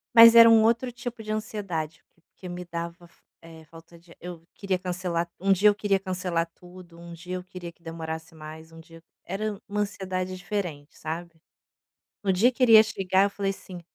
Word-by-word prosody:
Mas 230 0 +11
era 230 0 +10
um 225 -1 +6
outro 235 +3 +2
tipo 245 -1 -7
de 215 -1 -5
ansiedade, 195 -8 -4
porque 175 +2 -13
me 180 0 -6
dava 170 0 -6
fal - - -29 0.2
eh, 165 -1 -13
falta 165 +2 -16
de 170 0 -21
ar, - - -17
eu 175 -2 -9
queria 195 -2 -1
cancelar 180 -2 -3
um 195 +2 +1
dia 200 +3 +5
eu - - +3
queria 200 -1 +1
cancelar 180 -3 -2
tudo, 180 -1 -15
um 170 0 -10
dia 180 +2 -7
eu 180 - -5
queria 180 -2 -9
que 170 - -35
demorasse 165 0 -7
mais, 160 +1 -11
um 165 - -12
dia 165 0 -16 0.2
era 205 +3 -3
uma 210 +1 -3
ansiedade 185 -2 -3
diferente 175 -6 -5
sabe? 165 +1 -6 0.8
No 195 -2 +2
dia 220 +8 +4
que 255 - -4
ele 240 -2 +6
ia 215 - +11
chegar 195 -3 +1
eu 200 - 0
falei 200 0 -2
assim: 185 -2 -9
180 Hz, 200 wpm, -26 LUFS, 170-200 Hz, 0.8 s, Mas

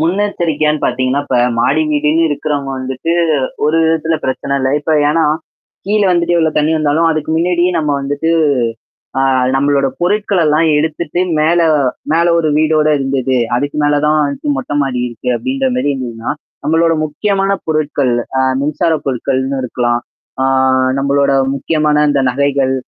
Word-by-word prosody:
முன்னெச்சரிக்கையான்னு 165 -4 0
பாத்தீங்கன்னா, 130 +2 0
இப்ப 130 - 0 0.2
மாடி 150 +6 +2
வீடுன்னு 150 +2 +2
இருக்கிறவங்க 145 -1 -2
வந்துட்டு, 130 +5 -3 0.5
ஒரு 155 +2 +2
விதத்தில 160 0 +1
பிரச்சனை 140 +1 -2
இல்ல 130 0 0
இப்ப 160 - -1 0.2
ஏன்னா, 160 +2 +2 0.6
கீழ 210 +1 +1
வந்துட்டு 175 -1 +1
எவ்ளோ 160 -1 +2
தண்ணீ 150 +2 +1
வந்தாலும், 155 +2 +2
அதுக்கு 155 0 -2
முன்னாடியே 175 +1 +1
நம்ம 150 -2 -1
வந்துட்டு 145 +4 -2 0.9
அ - - +1 0.3
நம்மளோட 140 0 +2
பொருட்களல்லாம் 175 -5 +1
எடுத்துட்டு 160 +2 -2 0.2
மேல 165 +3 +2 0.5
மேல 165 +1 +3
ஒரு 160 -2 +1
வீடோட 155 0 +2
இருந்தது, 135 -1 -1 0.2
அதுக்கு 145 +4 -3
மேல 145 0 +2
தான் 155 0 +3
வந்துட்டு 140 0 -3
மொட்டை 135 +2 -4
மாடி 130 -3 -2
இருக்கு 120 +1 -7
அப்டின்ற 265 - -1
மாரி 145 - 0
இருந்ததுன்னா, 120 -3 -5 0.3
நம்மளோட 165 +1 +2
முக்கியமான 195 +5 -1
பொருட்கள், 150 -5 0 0.2
அ - - +3 0.2
மின்சார 150 +3 0
பொருட்கள்னு 130 +1 -1
இருக்கலாம். 120 -1 -1 0.4
ஆ - - +2 0.5
நம்மளோட 140 0 +1 0.2
முக்கியமான 150 +1 0
இந்த 140 -1 +1
நகைகள், 135 0 0
150 Hz, 140 wpm, -15 LUFS, 135-165 Hz, 0.9 s, மேல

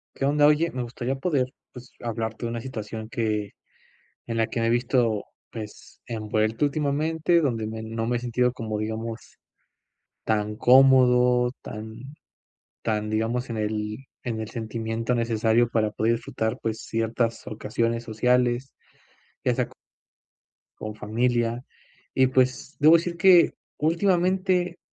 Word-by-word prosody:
¿Qué 135 - -3
onda? 145 +1 +4
Oye, 155 +3 +3
me 125 - -3
gustaría 120 +2 -3
poder, 135 -4 0 0.2
pues, 125 0 -12
hablarte 115 0 -4
de - - -3
una 115 0 -3
situación 110 -3 -6
que 105 -3 -1 0.8
en 115 -1 -3
la 115 -1 +2
que - - -3
me 115 - +1
he - - +2
visto, 120 -2 +1 0.3
pues, 110 -2 -9
envuelto, 110 +2 0
últimamente, 155 +4 +1
donde 115 -7 -1
me 110 0 -5
no 115 0 -3
me 120 +1 0
he - - -3
sentido 125 +1 +1
como, 110 -4 -4
digamos, 110 +2 -5 0.9
tan 105 -1 0
cómodo, 125 -1 +5
tan, 110 +1 -8 0.8
tan, 105 -1 -1
digamos, 115 +3 -1
en 115 - -3
el 105 0 -2 0.3
en 115 -3 -3
el 110 - -5
sentimiento 115 +1 -3
necesario 115 0 +2
para 110 -2 +1
poder 110 +2 +1
disfrutar, 110 -1 -2
pues, 110 0 -2
ciertas 115 +1 -1
ocasiones 115 +2 -2
sociales, 125 +3 +1 0.7
ya - - +3
sea - - +1
c - - -19 1.1
con 110 0 -5
familia. 120 +2 0 0.5
Y, 130 -1 +4
pues, 130 +2 0
debo 155 +3 +8
decir 170 +1 -3
que, 180 0 +6 0.3
últimamente, 180 +2 +1
115 Hz, 140 wpm, -25 LUFS, 110-130 Hz, 1.1 s, debo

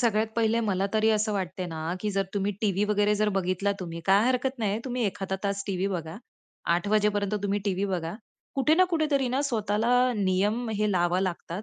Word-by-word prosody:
सगळ्यात 220 -3 +2
पहिले 230 0 +2
मला 195 -1 +1
तरी 220 0 +3
असं 215 0 +1
वाटतं 185 -2 -3
ना, 160 +1 -3
की 210 - -1
जर 195 0 +1
तुम्ही 200 +1 0
टीव्ही 205 -1 +1
वगैरे 210 0 +3
जर 210 0 +1
बघितला 195 0 0
तुम्ही 170 -2 -5
काय 200 +3 +5
हरकत 260 +1 0
नाहीये, 210 -1 0
तुम्ही 250 -2 -2
एखादा 190 -1 -2
तास 200 0 -1
टीव्ही 195 -1 -1
बघा. 170 -3 -4 0.6
8:00 175 +3 -1
वाजेपर्यंत 210 -1 +1
तुम्ही 200 0 0
टीव्ही 195 -1 0
बघा. 175 -4 -2 0.4
कुठे 290 +3 +3
ना 370 +2 +5
कुठेतरी 300 -6 +1
ना, 255 +3 0
स्वतःला 220 -4 0 0.3
नियम 205 +4 +1
हे 210 0 +1
लावावे 180 +1 +2
लागतात, 180 +1 -4
205 Hz, 190 wpm, -27 LUFS, 190-220 Hz, 0.6 s, काय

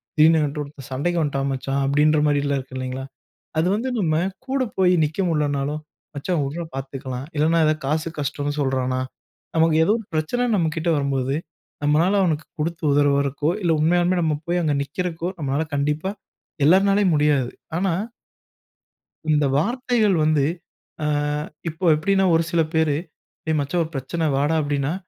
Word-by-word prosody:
திடீர்னு 160 +1 +6
என்கிட்ட 150 0 -1
ஒருத்தன் 140 -2 -11
சண்டைக்கு 170 +6 0
வந்துட்டான் 140 -2 -1
மச்சான், 135 +1 -2
அப்பிடின்ற 150 +2 +3
மாரிலாம் 140 -1 +1
இருக்கு 130 0 -10
இல்டவேங்களா! 130 +1 -4 0.5
அது 170 - +2
வந்து 250 +4 -2
நம்ம 160 -5 +1 0.3
கூட 265 0 0 0.2
போய் 180 -1 +4
நிற்க 155 +5 -2
முடியலனாலும், 150 -1 -1 0.3
மச்சான் 155 +2 -1
வுட்றா 165 +5 -4
பார்த்துக்கலாம், 135 -1 -5
இல்லன்னா 160 +2 +3
எதாவது 155 0 +1
காசு 155 +2 0
கஷ்டன்னு 145 +1 -2
சொல்றானா! 130 -1 0 0.5
நமக்கு 160 -1 +4
ஏதோ 205 - +3
ஒரு 220 - -10
பிரச்சனை 155 +11 0
நம்மக்கிட்ட 165 -1 0
வரும்போது 135 -1 0 0.5
நம்மளால 165 +7 +3
அவனுக்கு 160 -3 0
கொடுத்து 170 +3 -2
உதவுறதுக்கோ! 140 +1 +2
இல்ல 170 -2 +2
உண்மையாலுமே 175 +2 +3
நம்ம 160 -2 +1
போய் 175 +1 0
அங்க 150 -2 +1
நிற்கிறக்கோ! 170 +4 -3
நம்மளால 140 +2 0
கண்டிப்பா 150 +6 0 0.6
எல்லார்னாலயும் 195 +1 +4
முடியாது. 145 -4 +2 0.3
ஆனா 190 0 +1 1.4
இந்த 150 -1 +3
வார்த்தைகள் 230 - +1
வந்து, 155 -3 +3 0.6
ஆ - - 0 0.6
இப்போ 170 +4 -5
எப்பிடின்னா 195 +4 +2
ஒரு 165 - +3
சில 170 -1 +3
பேரு, 160 -3 +2 0.5
ஏய் 155 - +2
மச்சான்! 155 +5 0
ஒரு 160 - -7
பிரச்சனை 160 +5 -2
வாடா, 145 +3 +1
அப்பிடின்னா, 145 +1 -1
155 Hz, 145 wpm, -22 LUFS, 140-170 Hz, 1.4 s, திடீர்னு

